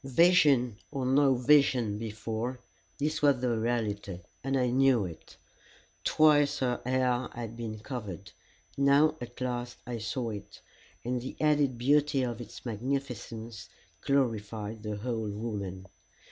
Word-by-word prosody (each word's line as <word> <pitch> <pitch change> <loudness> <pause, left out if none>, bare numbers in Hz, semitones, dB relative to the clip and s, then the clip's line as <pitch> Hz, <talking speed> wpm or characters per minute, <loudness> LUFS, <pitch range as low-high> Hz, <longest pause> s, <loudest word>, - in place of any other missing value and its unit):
Vision 135 - +4
or 135 -3 -3
no 135 +1 +4
vision 125 -5 +3
before, 110 +3 -4 0.4
this 155 +2 -1
was 140 -3 +4
the 125 -2 0
reality, 110 -5 -2 0.2
and 135 +1 0
I 125 -2 +1
knew 130 -4 +4
it. 85 -3 -10 0.7
Twice 150 -2 +4
her 125 -2 -1
hair 125 0 +1
had 115 -1 -6
been 115 -2 -5
covered, 100 -7 -6 0.4
now 140 +3 +4
at 120 0 -8
last 125 -1 -3
I 120 -2 -4
saw 115 +1 -3
it, 100 -1 -9 0.5
and 125 0 -1
the 130 - -6
added 145 -4 +2
beauty 140 +2 +3
of 120 -1 -3
its 115 +2 -10
magnificence 115 -2 -4 0.3
glorified 110 -5 -1
the 105 -1 -4
whole 110 0 -3
woman. 100 -3 -5
120 Hz, 130 wpm, -30 LUFS, 110-135 Hz, 0.7 s, Vision